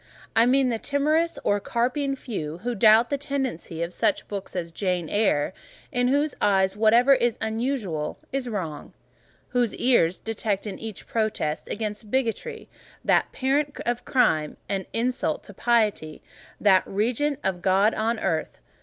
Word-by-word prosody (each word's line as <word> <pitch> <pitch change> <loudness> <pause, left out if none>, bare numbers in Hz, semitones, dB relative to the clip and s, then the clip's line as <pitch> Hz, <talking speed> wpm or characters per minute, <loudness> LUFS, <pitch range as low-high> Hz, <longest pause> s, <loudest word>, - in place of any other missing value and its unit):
I 230 +1 +5
mean 260 0 +3
the 230 -2 -1
timorous 310 +5 +1
or 205 - +2
carping 255 +6 -1
few 165 - -5
who 245 0 -1
doubt 220 +3 +5
the 280 - 0
tendency 265 - -3
of 170 +1 -5
such 310 0 0
books 200 -2 -6
as 170 -2 -3
"Jane 180 -1 -1
Eyre:" 195 -7 +1 0.4
in 245 0 +1
whose 285 +3 +1
eyes 190 -1 +3
whatever 230 +5 +5
is 240 -3 +1
unusual 220 - -2
is 265 -2 -2
wrong; 165 -9 -5 0.6
whose 245 -3 0
ears 185 -9 +3
detect 215 -2 -2
in 205 - -6
each 220 -3 -7
protest 215 -9 -2
against 210 0 -4
bigotry—that 265 - -2
parent 285 +2 0
of 240 0 -1
crime—an 190 - 0
insult 235 -9 -1
to 205 - -12
piety, 210 -9 0 0.4
that 190 -3 +5
regent 245 +8 0
of 190 -2 -1
God 195 +4 +3
on 225 +2 0
earth. 160 - -1
225 Hz, 145 wpm, -25 LUFS, 190-255 Hz, 0.6 s, I